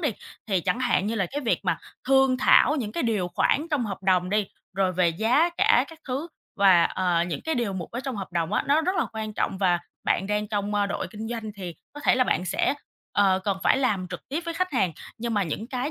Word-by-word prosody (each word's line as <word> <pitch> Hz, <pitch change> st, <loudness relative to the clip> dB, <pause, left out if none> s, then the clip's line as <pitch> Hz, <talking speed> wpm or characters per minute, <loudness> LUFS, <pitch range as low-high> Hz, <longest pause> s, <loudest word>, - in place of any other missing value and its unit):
đi, 295 Hz, -7 st, +1 dB, 0.4 s
thì 190 Hz, -4 st, +1 dB
chẳng 245 Hz, -, -1 dB
hạn 205 Hz, -5 st, +1 dB
như 225 Hz, -, -1 dB
là 195 Hz, -4 st, 0 dB
cái 290 Hz, -, -3 dB
việc 235 Hz, -, 0 dB
mà -, -, +1 dB, 0.3 s
thương 265 Hz, -1 st, +4 dB
thảo 295 Hz, -, +5 dB
những 215 Hz, -7 st, -3 dB
cái -, -, -2 dB
điều 210 Hz, -7 st, 0 dB
khoản 285 Hz, -, +1 dB
trong 280 Hz, -6 st, +1 dB
hợp 195 Hz, -1 st, -6 dB
đồng 185 Hz, -1 st, +2 dB
đi, 210 Hz, -1 st, +1 dB, 0.3 s
rồi 190 Hz, -1 st, +2 dB
về 180 Hz, -1 st, +3 dB
giá 235 Hz, -, +2 dB
cả 250 Hz, -, +4 dB
các 325 Hz, -1 st, -13 dB
thứ 280 Hz, +7 st, -3 dB, 0.3 s
và, 185 Hz, -4 st, +6 dB
ờ, 175 Hz, -2 st, +1 dB
những 175 Hz, -, -4 dB
cái 320 Hz, -1 st, 0 dB
điều 230 Hz, -5 st, -1 dB
mục 180 Hz, -3 st, -5 dB
ở 240 Hz, -, -4 dB
trong 265 Hz, -4 st, -4 dB
hợp 195 Hz, -2 st, -6 dB
đồng 165 Hz, -1 st, -1 dB
á, -, -, +2 dB
nó 295 Hz, +3 st, +4 dB
rất 365 Hz, +3 st, -1 dB
là -, -, +1 dB
quan 220 Hz, -1 st, -4 dB
trọng 190 Hz, -, -1 dB
và 180 Hz, -3 st, +3 dB, 0.3 s
bạn 195 Hz, -, +1 dB
đang 210 Hz, 0 st, -1 dB
trong, 205 Hz, -1 st, -2 dB
ơ, 205 Hz, -1 st, +2 dB
đội 200 Hz, -, -3 dB
kinh 220 Hz, 0 st, -6 dB
doanh 225 Hz, -3 st, -5 dB
thì 180 Hz, -4 st, -6 dB, 0.2 s
có 295 Hz, -, -9 dB
thể -, -, +4 dB
là 255 Hz, 0 st, +3 dB
bạn 180 Hz, -, 0 dB
sẽ, 195 Hz, +9 st, +1 dB, 0.4 s
ờ, 195 Hz, -2 st, +3 dB
cần 195 Hz, -2 st, 0 dB
phải 270 Hz, -, +4 dB
làm 205 Hz, -9 st, 0 dB
trực -, -, -8 dB
tiếp 300 Hz, +5 st, -2 dB
với 335 Hz, -1 st, -4 dB
khách 365 Hz, -2 st, -1 dB
hàng. 190 Hz, -9 st, +1 dB, 0.3 s
Nhưng 230 Hz, -1 st, -2 dB
mà 205 Hz, -, +2 dB
những 185 Hz, +7 st, -4 dB
cái 255 Hz, +3 st, -3 dB
215 Hz, 255 wpm, -25 LUFS, 190-260 Hz, 0.4 s, và